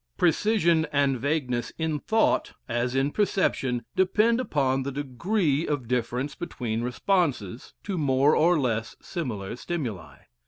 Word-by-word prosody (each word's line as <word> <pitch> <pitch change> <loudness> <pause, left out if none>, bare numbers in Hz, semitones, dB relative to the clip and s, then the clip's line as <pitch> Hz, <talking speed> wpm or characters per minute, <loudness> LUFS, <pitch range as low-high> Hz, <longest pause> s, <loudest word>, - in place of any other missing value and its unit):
Precision 170 -2 +3
and 140 -3 +2
vagueness 130 -3 -1
in 160 -2 -1
thought, 220 +9 +1
as 120 +1 -1
in 135 +2 +1
perception, 135 - 0
depend 215 +5 +3
upon 135 - +1
the 140 +1 -3
degree 145 - 0
of 140 -5 -2
difference 125 +3 -1
between 115 -9 -4
responses 125 - -1
to 195 -4 -3
more 140 0 +3
or 170 +2 +4
less 115 -4 -1
similar 115 - -4
stimuli. 125 - -5
140 Hz, 125 wpm, -26 LUFS, 125-170 Hz, -, or